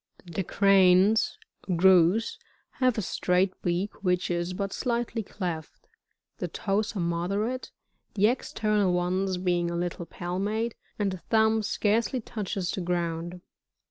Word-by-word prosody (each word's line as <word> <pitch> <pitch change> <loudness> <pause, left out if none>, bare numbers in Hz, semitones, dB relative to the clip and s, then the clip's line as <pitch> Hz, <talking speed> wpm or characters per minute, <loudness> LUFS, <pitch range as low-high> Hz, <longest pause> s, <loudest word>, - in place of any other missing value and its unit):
30. 170 - -11
The 195 - -1
Cranbs, 195 +2 +4 0.2
— - - -24
Griw,— 185 +4 +4 0.4
have 255 -3 +3
a 215 - 0
straight 185 +1 +1
beak 180 +4 -2
which 180 -1 +1
is 175 +1 -1
but 195 +1 -3
dightly 235 -1 -1
cleft; 175 -6 -6 0.5
the - - -2
toes 210 +2 -1
are - - -2
moderate, 195 +9 -1 0.5
the 205 0 +3
external 215 -4 +1
ones 185 +1 0
being 175 -1 0
a 170 - -3
little 175 0 -3
palmate, 205 +6 -2 0.2
and 205 -2 0
the 185 - -4
thumb 220 +2 +2
scarcely 220 +4 0
touches 200 -5 -3
the 190 - -3
ground. 175 0 -2
190 Hz, 140 wpm, -27 LUFS, 175-215 Hz, 0.5 s, Cranbs